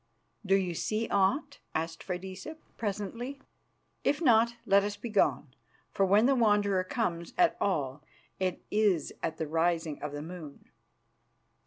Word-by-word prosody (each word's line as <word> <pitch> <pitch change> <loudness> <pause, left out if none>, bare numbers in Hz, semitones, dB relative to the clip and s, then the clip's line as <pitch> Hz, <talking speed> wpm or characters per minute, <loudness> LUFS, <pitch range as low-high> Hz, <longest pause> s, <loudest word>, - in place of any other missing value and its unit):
"Do 195 -1 +3
you 185 -3 0
see 215 +6 -1
aught?" 255 +9 +1 0.2
asked 165 +1 -2
Freydisa 190 - -6 0.2
presently. 230 +6 -4 0.6
"If 290 - +2
not, 235 -6 +4
let 200 -2 +5
us 205 0 -3
be 235 - -6
gone, 145 - +1 0.4
for 195 - +2
when 205 +4 +5
the 275 - +5
Wanderer 205 -5 +3
comes 175 -5 -2
at 350 -2 +4
all 145 -7 0 0.4
it 185 -2 -1
is 205 -7 +2
at 160 - -2
the 160 - -2
rising 165 0 0
of 150 - -4
the 145 0 -5
moon." 160 -4 -10
195 Hz, 145 wpm, -30 LUFS, 165-220 Hz, 0.6 s, let